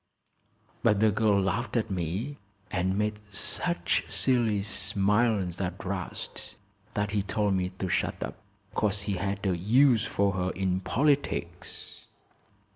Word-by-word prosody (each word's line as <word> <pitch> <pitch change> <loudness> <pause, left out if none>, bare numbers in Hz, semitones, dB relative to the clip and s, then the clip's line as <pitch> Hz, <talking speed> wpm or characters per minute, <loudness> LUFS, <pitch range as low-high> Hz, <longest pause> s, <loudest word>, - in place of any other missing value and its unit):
But 105 - +3
the 110 0 +5
girl 105 -1 +3
laughed 105 +5 0
at 110 -3 -1
me 95 - -3 0.3
and 95 +1 0
made 105 0 0
such 175 - 0
silly 115 -6 +2
smiles 100 -2 +1
at 90 0 -4
'Rast 95 -1 -5 0.4
that 105 -1 0
he 105 -1 +1
told 100 0 0
me 90 -1 0
to 95 - -2
shut - - 0
up, - - -6 0.3
'cause 105 -1 0
he 100 -1 -1
had 100 +2 -2
a 95 -2 +2
use 115 +6 +4
for 100 -4 +1
her 90 0 0
in 95 -1 0
politics." 95 - -1
100 Hz, 135 wpm, -28 LUFS, 95-110 Hz, 0.4 s, the